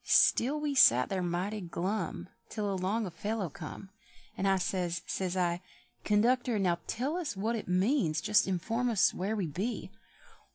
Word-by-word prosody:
Still 275 Hz, +6 st, +4 dB
we 295 Hz, -1 st, -1 dB
sat 125 Hz, -, +6 dB
there 190 Hz, -1 st, -1 dB
mighty 180 Hz, +4 st, -2 dB
glum 180 Hz, +2 st, -3 dB, 0.2 s
Till 205 Hz, -2 st, -2 dB
along 195 Hz, +4 st, -1 dB
a 180 Hz, -, -5 dB
fellow 205 Hz, 0 st, -3 dB
come. 190 Hz, +1 st, -9 dB, 0.4 s
And 195 Hz, -, -1 dB
I 195 Hz, 0 st, +4 dB
says, 180 Hz, -2 st, -2 dB
says 185 Hz, -1 st, -2 dB
I, 175 Hz, -1 st, 0 dB, 0.4 s
"Conductor, 240 Hz, +3 st, +2 dB
now 180 Hz, -4 st, +1 dB
tell 275 Hz, +8 st, -2 dB
us 300 Hz, -, -3 dB
what 220 Hz, +4 st, 0 dB
it 220 Hz, -, -5 dB
means, 180 Hz, -, +2 dB
Just 210 Hz, +6 st, +3 dB
inform 225 Hz, +7 st, -1 dB
us 215 Hz, -6 st, +3 dB
where 200 Hz, +4 st, -2 dB
we 200 Hz, -4 st, -1 dB
be?" 190 Hz, +7 st, -4 dB
195 Hz, 165 wpm, -31 LUFS, 180-225 Hz, 0.4 s, sat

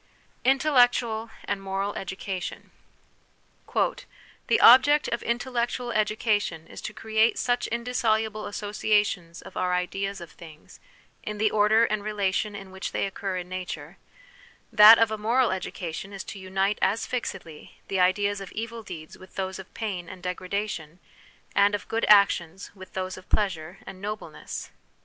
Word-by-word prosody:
Intellectual 245 Hz, -5 st, +3 dB, 0.2 s
and 200 Hz, -1 st, -2 dB
Moral 195 Hz, +1 st, -2 dB
Education. 190 Hz, 0 st, -5 dB, 1.0 s
"The -, -, -2 dB
object 290 Hz, +5 st, +7 dB
of 235 Hz, -, -2 dB
intellectual 240 Hz, 0 st, -2 dB
education 210 Hz, -6 st, 0 dB
is -, -, -10 dB
to -, -, -5 dB
create 220 Hz, 0 st, +2 dB
such 245 Hz, 0 st, 0 dB
indissoluble 220 Hz, -3 st, -1 dB
associations 205 Hz, -4 st, -1 dB
of -, -, -12 dB
our 180 Hz, 0 st, +1 dB
ideas 195 Hz, +2 st, -2 dB
of 170 Hz, -2 st, -10 dB
things, 160 Hz, -3 st, -14 dB, 0.4 s
in 210 Hz, 0 st, -5 dB
the 215 Hz, 0 st, +2 dB
order 215 Hz, +2 st, +4 dB
and 210 Hz, -2 st, -2 dB
relation 205 Hz, 0 st, -1 dB
in 195 Hz, -1 st, -9 dB
which 190 Hz, 0 st, -6 dB
they -, -, 0 dB
occur 195 Hz, -1 st, -4 dB
in 180 Hz, -1 st, -5 dB
nature; 185 Hz, 0 st, -6 dB, 0.8 s
that 215 Hz, +2 st, +10 dB
of 225 Hz, -1 st, +3 dB
a 215 Hz, -, -3 dB
moral 235 Hz, +2 st, +2 dB
education 185 Hz, 0 st, -5 dB
is 195 Hz, -, -6 dB
to 200 Hz, -, -8 dB
unite 190 Hz, +2 st, 0 dB
as 220 Hz, +4 st, +1 dB
fixedly, 190 Hz, -10 st, -6 dB
the 195 Hz, -, -1 dB
ideas 200 Hz, +2 st, +2 dB
of 195 Hz, -, -8 dB
evil 230 Hz, +1 st, -5 dB
deeds 165 Hz, -7 st, -10 dB
with 185 Hz, 0 st, -15 dB
those 190 Hz, -1 st, -3 dB
of 190 Hz, -, -11 dB
pain 190 Hz, -6 st, -4 dB
and 185 Hz, -1 st, -11 dB
degradation, 180 Hz, -3 st, -4 dB, 0.6 s
and 200 Hz, +1 st, +4 dB
of 205 Hz, -, -7 dB
good 225 Hz, +1 st, -1 dB
actions 190 Hz, -3 st, +4 dB
with 190 Hz, -2 st, -13 dB
those 185 Hz, 0 st, -4 dB
of 185 Hz, -, -14 dB
pleasure 175 Hz, -3 st, -1 dB
and 185 Hz, -, -10 dB
nobleness." 210 Hz, +1 st, -6 dB
200 Hz, 150 wpm, -26 LUFS, 185-220 Hz, 1.0 s, that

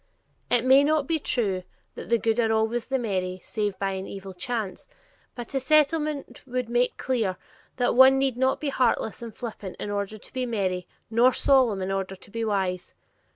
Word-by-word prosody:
It 245 Hz, 0 st, +2 dB
may 265 Hz, +2 st, +7 dB
not 305 Hz, 0 st, +2 dB
be 320 Hz, +3 st, 0 dB
true 205 Hz, -10 st, 0 dB, 0.3 s
"That -, -, -9 dB
the 235 Hz, -, +4 dB
good 225 Hz, +1 st, 0 dB
are 225 Hz, -1 st, +2 dB
always 220 Hz, +1 st, 0 dB
the 265 Hz, -, 0 dB
merry 185 Hz, -6 st, -2 dB
Save 210 Hz, -3 st, -2 dB
by 195 Hz, -1 st, -1 dB
an 190 Hz, 0 st, -5 dB
evil 195 Hz, -1 st, -8 dB
chance," 205 Hz, 0 st, -4 dB, 0.5 s
but 240 Hz, 0 st, -7 dB
a 270 Hz, -, +1 dB
Settlement 300 Hz, +1 st, +1 dB
would 250 Hz, -2 st, -3 dB
make 245 Hz, +1 st, +1 dB
clear 225 Hz, -8 st, -1 dB, 0.4 s
that 245 Hz, -1 st, +1 dB
one 265 Hz, +2 st, +7 dB
need 270 Hz, -2 st, +1 dB
not 260 Hz, +1 st, +1 dB
be 300 Hz, -, -2 dB
heartless 240 Hz, -4 st, 0 dB
and 230 Hz, -1 st, -6 dB
flippant 215 Hz, -4 st, -7 dB
in 205 Hz, -, -4 dB
order 205 Hz, +1 st, -3 dB
to -, -, -15 dB
be 255 Hz, -1 st, -2 dB
merry, 185 Hz, -5 st, -1 dB, 0.2 s
nor 240 Hz, +3 st, +5 dB
solemn 245 Hz, -8 st, +3 dB
in 190 Hz, -, -2 dB
order 195 Hz, 0 st, -2 dB
to 190 Hz, -, -17 dB
be 230 Hz, +1 st, -3 dB
wise. 190 Hz, -4 st, -2 dB
230 Hz, 195 wpm, -26 LUFS, 195-260 Hz, 0.5 s, may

